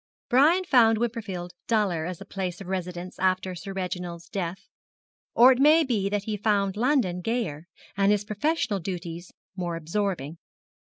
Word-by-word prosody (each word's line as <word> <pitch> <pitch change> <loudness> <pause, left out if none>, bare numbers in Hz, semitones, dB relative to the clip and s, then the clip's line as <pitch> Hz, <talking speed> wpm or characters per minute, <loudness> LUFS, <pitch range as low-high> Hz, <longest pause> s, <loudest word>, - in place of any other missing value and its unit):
Brian 310 +9 +5
found 230 -7 +5
Wimperfield 215 -7 -3
duller 195 -8 +1
as 180 -2 -6
a 195 - -9
place 185 -3 -4
of 195 - -8
residence 180 -1 -5
after 185 0 +1
Sir 195 +3 -7
Reginald's 180 -2 -5
death; 185 -3 -4 0.7
or 250 +3 +8
it 255 - +1
may 305 +4 +6
be 215 -8 0
that 205 0 -1
he 215 0 -3
found 200 -2 +1
London 225 -7 +1
gayer, 175 -8 -2 0.3
and 195 +1 +3
his 210 0 +1
professional 215 0 0
duties 175 -1 -6 0.2
more 175 -3 -3
absorbing. 165 -2 -3
195 Hz, 155 wpm, -26 LUFS, 180-225 Hz, 0.7 s, or